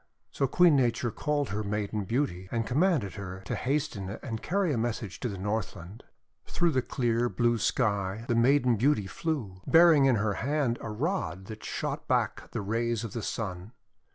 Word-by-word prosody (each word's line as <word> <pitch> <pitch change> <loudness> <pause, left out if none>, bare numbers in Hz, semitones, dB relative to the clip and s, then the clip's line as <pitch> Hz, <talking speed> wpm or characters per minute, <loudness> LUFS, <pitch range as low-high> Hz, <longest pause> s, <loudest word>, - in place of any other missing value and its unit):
So 135 - 0
Queen 170 +3 +5
Nature 120 -2 +1
called 145 +5 -1
her 105 +1 -2
Maiden 105 0 -2
Beauty, 95 -6 -1
and 115 -1 -1
commanded 140 - +1
her 95 -2 -7
to - - -3
hasten 135 -8 -2
and 115 -5 -4
carry 185 -3 0
a - - 0
message 110 -4 -3
to 125 - -2
the 100 - -5
Northland. 100 -1 -4 0.4
Through 175 -2 +1
the 130 - +2
clear, 120 -1 0
blue 120 -1 +1
sky 105 -3 0
the - - +1
Maiden 125 0 +4
Beauty 120 -3 +2
flew, 100 - -4
bearing 165 -4 +7
in 130 -2 +4
her 105 -1 0
hand 140 -3 0
a 115 - -5
rod 105 - -2
that 110 +2 -9
shot - - -4
back - - 0
the - - -4
rays 115 +2 -1
of 115 - -6
the 115 - -3
Sun. 100 0 -4
115 Hz, 180 wpm, -29 LUFS, 100-140 Hz, 0.4 s, bearing